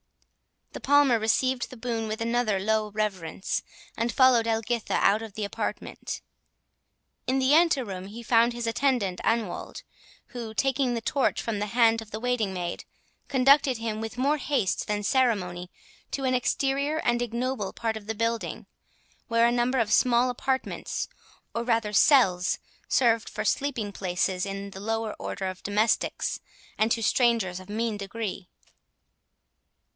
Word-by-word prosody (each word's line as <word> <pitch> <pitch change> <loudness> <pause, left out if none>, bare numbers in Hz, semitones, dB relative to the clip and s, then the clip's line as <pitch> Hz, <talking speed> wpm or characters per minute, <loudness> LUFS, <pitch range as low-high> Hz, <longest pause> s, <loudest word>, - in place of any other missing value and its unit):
The - - -6
Palmer 285 -4 +4
received 245 +3 +1
the 255 - -11
boon 230 -1 -3
with 215 +1 -4
another 230 -3 +1
low 215 +2 0
reverence, 200 -4 -2 0.3
and 235 +1 -1
followed 250 -3 +5
Edwina 225 +1 0
out 210 +2 +3
of 220 -3 -8
the 215 0 -4
apartment. 200 - -4 1.1
In 260 +1 +2
the 265 +1 +3
anteroom 260 - +2
he 225 +4 -9
found 235 0 +3
his 240 0 -4
attendant 230 -6 0
Anwold, 225 -6 -2 0.4
who, 230 -3 -7
taking 265 -1 +1
the 230 - -2
torch 270 +4 +1
from 225 -3 -2
the 210 - -2
hand 230 0 +3
of 220 - -11
the 215 +1 -6
waiting 245 -5 0
maid, 175 -2 -4 0.4
conducted 275 0 +4
him 220 -1 -3
with 225 +2 -6
more 280 +4 +2
haste 270 -10 -1
than 210 0 -1
ceremony 195 -8 +1 0.4
to 275 - -3
an 260 -1 +1
exterior 275 +4 0
and 240 -3 +1
ignoble 240 -2 -2
part 225 -1 -2
of 210 -1 -11
the 220 - -2
building, 230 +1 -2 0.6
where 230 0 +3
a 235 - +4
number 245 +2 +1
of 225 -3 +1
small 250 0 +4
apartments, 260 +2 -2 0.4
or 230 - -2
rather 230 -3 0
cells, 195 -8 +4 0.3
served 230 -3 +2
for 215 - -4
sleeping 245 -5 -1
places 180 -1 -1
to 195 0 -4
the 190 - -9
lower 225 +1 -2
order 195 - -4
of 185 -1 -5
domestics, 210 +2 0 0.4
and 220 +1 +1
to 225 - +1
strangers 225 -7 +2
of 185 +1 -13
mean 220 0 -1
degree. 200 -2 -5
230 Hz, 150 wpm, -27 LUFS, 210-250 Hz, 1.1 s, followed